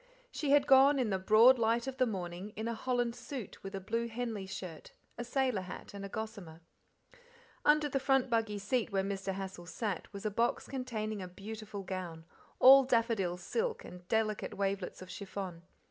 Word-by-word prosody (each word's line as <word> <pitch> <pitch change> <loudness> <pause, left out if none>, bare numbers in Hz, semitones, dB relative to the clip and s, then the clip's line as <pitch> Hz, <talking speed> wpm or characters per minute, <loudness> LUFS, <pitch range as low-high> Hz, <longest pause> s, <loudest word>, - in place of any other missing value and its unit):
She 295 - -3
had 285 0 +5
gone, 275 +1 +7
in 245 -5 0
the 190 - 0
broad 225 +6 +6
light 230 +1 +2
of 265 -1 -5
the 255 -1 +3
morning, 185 0 -5
in 220 +1 -3
a 235 - -1
holland 245 0 -1
suit 255 -8 -7
with 195 0 -7
a - - -3
blue 230 +5 -2
Henley 225 -4 -4
shirt, 185 -4 -8 0.2
a - - -4
sailor 250 -4 0
hat, 185 +2 -9
and 200 0 -7
a 200 - -5
gossamer. 200 -7 -7 1.0
Under 300 0 +4
the 275 -1 -1
front 270 -1 +2
buggy 225 -3 0
seat 225 +4 -1
where 195 -1 +1
Mr. 195 0 -3
Hassal 190 -2 -6
sat 190 +1 -4
was 200 +1 -8
a 215 - 0
box 230 +4 0
containing 220 -6 -3
a 185 - -5
beautiful 205 +2 -7
gown, 175 -4 -6 0.3
all 270 +1 +9
daffodil 230 -8 +1
silk 460 - -2
and 180 0 -11
delicate 215 0 0
wavelets 195 -2 -2
of 185 - -11
chiffon. 190 -3 -6
215 Hz, 185 wpm, -33 LUFS, 190-245 Hz, 1.0 s, all